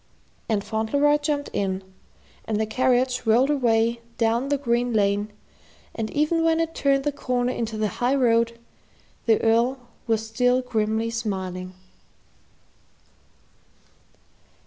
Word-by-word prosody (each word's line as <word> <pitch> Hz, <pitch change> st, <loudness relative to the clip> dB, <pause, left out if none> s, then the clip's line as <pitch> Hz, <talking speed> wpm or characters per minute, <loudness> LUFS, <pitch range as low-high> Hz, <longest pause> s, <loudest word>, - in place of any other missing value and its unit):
And 210 Hz, -3 st, 0 dB
Fauntleroy 280 Hz, +8 st, +1 dB
jumped 290 Hz, -1 st, -2 dB
in, 190 Hz, -1 st, -1 dB, 0.6 s
and 215 Hz, -1 st, -1 dB
the 220 Hz, -, +1 dB
carriage 250 Hz, +1 st, +1 dB
rolled 245 Hz, +6 st, +4 dB
away 235 Hz, -4 st, +1 dB, 0.2 s
down 235 Hz, +4 st, +1 dB
the 285 Hz, -, +2 dB
green 240 Hz, -2 st, 0 dB
lane, 205 Hz, 0 st, +1 dB, 0.6 s
and 220 Hz, -1 st, -3 dB
even 305 Hz, +5 st, +1 dB
when 325 Hz, 0 st, +2 dB
it 330 Hz, 0 st, -1 dB
turned 275 Hz, -2 st, +1 dB
the 295 Hz, -, 0 dB
corner 250 Hz, -3 st, -1 dB
into 225 Hz, -2 st, -3 dB
the 215 Hz, 0 st, +1 dB
high 250 Hz, +3 st, +3 dB
road, 235 Hz, -3 st, +2 dB, 0.7 s
the 225 Hz, -1 st, +4 dB
Earl 235 Hz, +4 st, +3 dB, 0.3 s
was 225 Hz, -1 st, 0 dB
still 250 Hz, +3 st, +1 dB
grimly 220 Hz, -1 st, -1 dB
smiling. 185 Hz, -5 st, -4 dB
235 Hz, 125 wpm, -24 LUFS, 220-265 Hz, 0.7 s, rolled